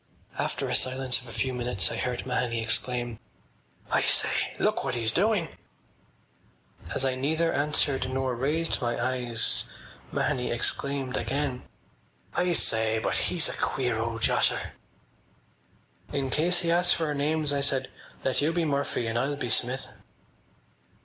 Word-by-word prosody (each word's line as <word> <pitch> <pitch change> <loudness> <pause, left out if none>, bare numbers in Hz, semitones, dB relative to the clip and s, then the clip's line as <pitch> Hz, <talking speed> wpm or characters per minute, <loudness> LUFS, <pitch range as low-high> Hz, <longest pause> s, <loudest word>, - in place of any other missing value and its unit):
After - - -1
a - - -2
silence 130 0 +1
of 125 - -14
a - - -9
few 130 +3 -1
minutes 120 -5 -1
I - - -3
heard 125 -1 -2
Mahony 125 -2 -1
exclaim: 120 +1 -1 0.7
“I - - +3
say! - - +2
Look - - +1
what 130 -2 -2
he’s 115 -2 +1
doing!” 195 - +2 1.5
As 135 - +1
I 130 - +1
neither 160 +6 0
answered 140 -3 +1
nor 130 -1 -1
raised 150 +7 0
my 120 -1 -1
eyes 120 -2 +1 0.5
Mahony 130 -4 0
exclaimed 135 +2 0
again: 135 +1 -2 0.7
“I 180 0 +1
say.... 110 -6 +3
He’s 170 -3 +2
a - - -4
queer 125 -4 -1
old 115 0 -3
josser!” - - +2 1.4
“In 135 -2 -1
case 175 +3 +3
he 170 - 0
asks 175 +1 +5
us - - -1
for 165 - 0
our 150 - -1
names,” 150 +1 0
I 140 - 0
said, 135 -2 +1 0.4
“let 130 - +1
you 150 +3 +2
be 170 -1 0
Murphy 140 -4 -1
and 115 +1 0
I’ll 140 +3 0
be 125 -5 -3
Smith. 130 +2 +1
130 Hz, 150 wpm, -27 LUFS, 120-145 Hz, 1.5 s, asks